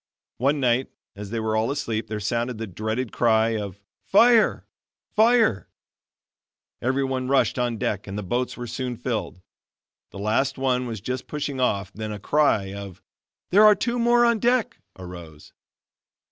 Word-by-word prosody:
One 140 +4 +2
night, 125 0 +1 0.3
as 100 0 -8
they 115 +1 -3
were 110 0 -1
all 110 +1 +1
asleep 115 -6 -2
there 110 0 -4
sounded 115 +3 -2
the 115 - -4
dreaded 110 +5 -3
cry 110 -1 +3
of 100 -3 -5 0.2
"Fire, 230 +2 +4 0.5
fire!" 225 - +3 1.1
Everyone 130 0 -1
rushed 135 0 +2
on 120 -2 -1
deck 105 -1 -2
and 100 +1 -5
the 105 - -4
boats 120 +7 -2
were 120 - -5
soon 125 0 -4
filled. 90 - -4 0.7
The - - -11
last 110 +8 0
one 130 -1 0
was 110 -4 -5
just 125 +3 -4
pushing 145 -2 -4
off 100 -6 0
then 110 0 -5
a 105 - -5
cry 105 -5 +1
of 100 -3 -9 0.5
"there 205 +4 +6
are 210 -1 +8
two 235 +4 -2
more 240 0 +4
on 235 -2 +2
deck," 245 0 +1 0.2
arose. 85 -4 -11
120 Hz, 160 wpm, -24 LUFS, 105-140 Hz, 1.1 s, are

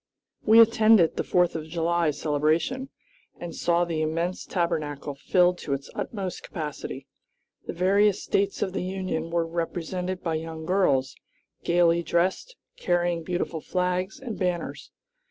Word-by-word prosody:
We 220 +1 +6
attended 220 -5 +6
the - - -1
Fourth 180 -2 +2
of 155 -1 -4
July 170 0 +1
celebration, 155 - 0 0.5
and 175 -1 -6
saw 175 0 +1
the 165 -2 -2
immense 165 +3 -2
Tabernacle 155 -5 -2
filled 180 +5 +2
to 140 - -3
its 140 0 -5
utmost 195 -5 -4
capacity. 150 -4 -6 0.6
The - - -3
various 195 +3 +3
States 200 0 0
of 190 - -3
the - - -2
Union 185 -3 -3
were 170 0 0
represented 175 +2 -3
by 165 - -1
young 160 -1 -7
girls, 145 -8 +2 0.5
gayly 170 0 +3
dressed, 185 - 0 0.2
carrying 175 -1 0
beautiful 170 -1 -3
flags 180 +3 -1
and 245 -5 -6
banners. 180 -2 -2
175 Hz, 135 wpm, -26 LUFS, 160-185 Hz, 0.6 s, We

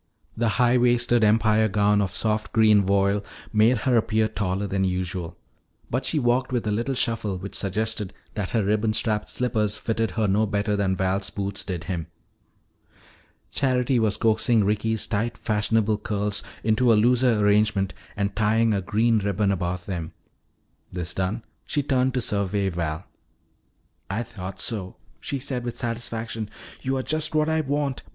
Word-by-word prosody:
The 115 0 +1
high 125 0 +4
waisted 120 -1 +3
Empire 110 0 +4
gown 105 0 +2
of 95 -3 -1
soft 105 +2 -1
green 110 -2 +5
voile 100 +1 +2 0.3
made 110 +4 +4
her 130 -2 +3
appear 110 -1 +2
taller 100 -2 -2
than 95 0 -1
usual. 90 -2 -3 0.5
But 130 +2 -1
she 160 - 0
walked 125 -1 +1
with 120 -3 -1
a 105 - 0
little 120 +6 -1
shuffle 110 -5 -1
which 95 +2 -7
suggested 105 +1 -1 0.2
that 105 -4 -3
her 115 -3 +1
ribbon 110 +1 +1
strapped 105 -1 0
slippers 110 -4 0
fitted 115 -1 -1
her 110 -2 +2
no 105 +3 +2
better 105 +1 0
than 100 -2 +1
Val's 95 +1 0
boots 100 0 -3
did 90 -3 -4
him. 90 -3 -4 1.4
Charity 130 -2 +1
was 110 -2 +1
coaxing 110 0 +3
Ricky's 105 +2 0
tight 115 +2 -2
fashionable 110 0 +1
curls 105 -1 -1 0.2
into 115 +2 +3
a - - +6
looser 120 +2 +3
arrangement 105 -2 +2 0.2
and 100 0 -2
tying 110 +1 +2
a 100 - 0
green 110 +4 +2
ribbon 100 0 0
about 90 -1 -2
them. 85 -5 -5 0.8
This 90 -1 -3
done, 95 +5 -2 0.2
she 145 - -1
turned 130 -1 +1
to 125 - +1
survey 100 -2 0
Val. 85 0 -3 1.0
"I 110 +5 -1
thought 95 -4 -8
so," 95 -3 -2 0.2
she 140 - -3
said 130 -2 -3
with 120 -1 -5
satisfaction. 115 -2 -3 0.3
"You 135 +1 -1
are 130 - -2
just 155 +2 0
what 155 0 +3
I 160 0 +1
want. 145 -2 -2
110 Hz, 160 wpm, -24 LUFS, 100-120 Hz, 1.4 s, a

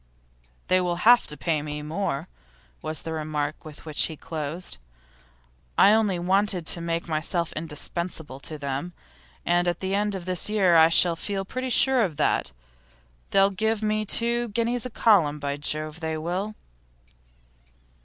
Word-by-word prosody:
'They'll 180 -1 +2
have 235 +7 +5
to 150 - -3
pay 150 +3 0
me 150 0 -5
more,' 155 -1 -2 0.5
was 155 0 -5
the 160 - -4
remark 155 -1 -3
with 155 0 -11
which 155 -2 +1
he 160 - -6
closed. 155 - -5 1.0
'I 205 - +7
only 210 -4 +2
wanted 185 0 +1
to 170 - 0
make 170 0 -2
myself 165 +2 -1
indispensable 160 -2 -4
to 155 +2 -6
them, 140 +4 -4 0.5
and 175 +1 +2
at 175 -1 0
the 190 0 -2
end 205 0 0
of 180 -2 -6
this 185 +1 -1
year 195 -5 +3
I 160 0 +7
shall 170 0 +4
feel 195 +3 -4
pretty 255 +5 -4
sure 260 +1 +3
of 175 -9 -1
that. 155 - +1 0.8
They'll 195 0 +4
have 190 - -13
to - - -2
give 220 -1 +1
me 215 0 +1
two 235 +3 +2
guineas 235 +3 -1
a - - -11
column; 190 -11 +3
by 140 -1 -3
Jove! 155 +2 -3
they 160 -1 -3
will. 185 +7 -3
175 Hz, 165 wpm, -25 LUFS, 155-205 Hz, 1.0 s, I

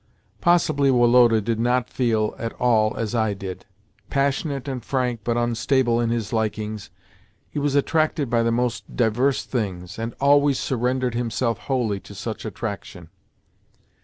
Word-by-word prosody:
Possibly 155 -5 +3
Woloda 120 -2 +5
did 115 +1 -2
not 125 +1 +1
feel 110 -4 0
at 115 - -4
all 110 -3 +2
as 115 0 -2
I 110 -3 +1
did. 95 -1 -7 0.4
Passionate 140 0 -1
and 130 -4 -4
frank, 125 -3 -1
but 120 +1 0
unstable 120 +1 +1
in 115 - 0
his 115 -3 -2
likings, 110 -1 -2 0.6
he 150 - -4
was 145 -1 0
attracted 155 0 +1
by 120 0 +2
the 115 0 +1
most 120 -1 -2
diverse 125 +4 +1
things, 95 -5 -4
and 115 +1 -4
always 140 0 +4
surrendered 125 0 -1
himself 115 -2 -1
wholly 120 -6 -1
to 100 - -13
such 110 +4 -5
attraction. 100 -5 -6
120 Hz, 145 wpm, -23 LUFS, 110-130 Hz, 0.6 s, Woloda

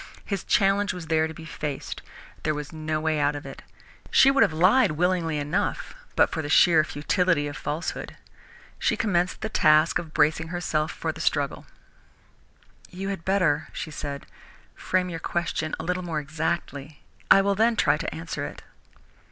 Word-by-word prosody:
His 200 -4 -3
challenge 200 +1 +2
was 175 -2 -7
there 160 0 +2
to 160 - -8
be 165 - -10
faced. 150 -3 -5 0.4
There 155 - 0
was 150 +1 -6
no 155 0 -2
way 155 -1 0
out 145 0 +1
of 145 - -7
it. 135 - -9 0.5
She 270 - +6
would 275 - +2
have - - +5
lied 185 +5 +4
willingly 170 -1 0
enough 145 +5 -2 0.2
but - - +4
for 160 - -2
the 145 - -5
sheer 160 +1 +6
futility 155 +1 0
of 145 - -6
falsehood. 150 +4 -4 0.6
She - - +1
commenced 180 -7 0
the - - -2
task 155 -4 +4
of 160 -2 -8
bracing 155 +2 +2
herself 160 -2 -1
for - - -3
the - - -9
struggle. - - -1 1.2
"You 195 +2 -5
had 195 -4 -4
better," 180 -6 +1
she 155 - -5
said, 140 -1 -6 0.5
"frame 185 0 -1
your 165 - -5
question 165 -2 -2
a - - -4
little 180 +2 -1
more 165 -4 -3
exactly. 150 -1 -4 0.3
I 195 - +7
will 200 0 +2
then 225 +3 +2
try - - +3
to - - -4
answer - - -5
it." - - -7
160 Hz, 175 wpm, -25 LUFS, 155-185 Hz, 1.2 s, I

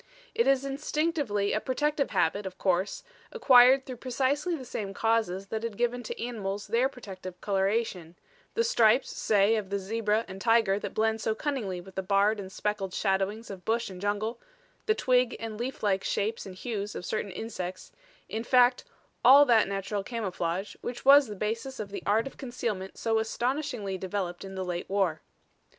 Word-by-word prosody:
It 465 +1 +2
is 275 0 +3
instinctively 280 -7 -1
a - - +1
protective 295 +4 0
habit, 200 +4 +1
of 185 0 -9
course, 185 +1 0 0.3
acquired 265 - +6
through 255 -2 -7
precisely 270 +7 0
the 265 -5 -8
same 200 -4 -5
causes 215 -4 0
that 220 - -2
had 230 -3 -5
given 245 +1 0
to 230 - -6
animals 205 -4 -4
their 235 +5 +2
protective 190 -8 -9
coloration 195 -3 -1 0.4
the 460 - +3
stripes, 240 - +3
say, 210 +1 +3
of 205 -3 -4
the 200 - 0
zebra 215 +2 0
and 190 0 -9
tiger 225 -3 +3
that - - -6
blend 220 0 +1
so 220 - 0
cunningly 230 -12 -3
with 190 +2 -12
the 190 - -2
barred 200 +3 +2
and 190 -1 -7
speckled 200 -2 -3
shadowings 200 +3 -1
of 185 -2 -9
bush 230 0 -1
and 180 -1 -9
jungle, 210 +3 -1 0.5
the 435 - +3
twig 250 - +2
and 225 -1 -6
leaflike 210 -6 -1
shapes 215 +1 -2
and 185 - -9
hues 210 -1 -4
of 180 - -5
certain 210 +1 -2
insects; 185 -3 -6 0.4
in 220 +1 -4
fact, 250 0 +4 0.4
all 280 +3 +9
that 230 -4 +4
natural 195 +1 -2
camouflage 195 -4 -3
which 245 +1 -6
was 280 0 +8
the 210 - -6
basis 230 +6 -3
of 205 -2 -5
the 200 - -5
art 215 +3 +3
of 275 - -8
concealment 230 -7 -4
so 225 -1 +1
astonishingly 240 -3 -2
developed 185 -2 -3
in 195 0 -8
the 190 0 -3
late 175 -1 -4
war. 190 -5 0
215 Hz, 175 wpm, -28 LUFS, 195-245 Hz, 0.5 s, all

